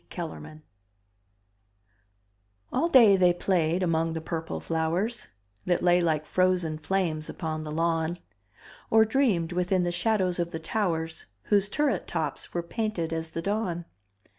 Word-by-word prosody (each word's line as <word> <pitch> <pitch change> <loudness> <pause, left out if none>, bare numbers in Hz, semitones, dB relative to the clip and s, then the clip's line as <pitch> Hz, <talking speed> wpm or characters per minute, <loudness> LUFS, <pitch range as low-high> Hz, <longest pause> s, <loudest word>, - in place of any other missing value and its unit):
Kellerman 155 -2 -7 2.1
All 335 - +2
day 230 -9 +7
they 180 -1 +4
played 175 -1 +1
among 165 -1 +1
the 165 - -3
purple 165 0 -4
flowers 175 +8 -1 0.4
That 175 -1 +1
lay 175 0 +4
like 155 -3 0
frozen 180 -2 +1
flames 160 -3 -1
upon 155 -2 -4
the 155 -1 -6
lawn; 165 +1 0 0.7
Or 220 0 +6
dreamed 215 -9 +1
within 180 +1 +1
the 175 - 0
shadows 185 0 0
of 170 -1 0
the 165 - -5
towers 165 -3 -2 0.2
Whose 205 -1 +2
turret 270 - 0
tops 160 -3 -3
were 175 - -2
painted 185 -4 -2
as 160 0 -3
the 165 +1 -5
dawn. 190 -4 -2
175 Hz, 140 wpm, -27 LUFS, 160-195 Hz, 2.1 s, day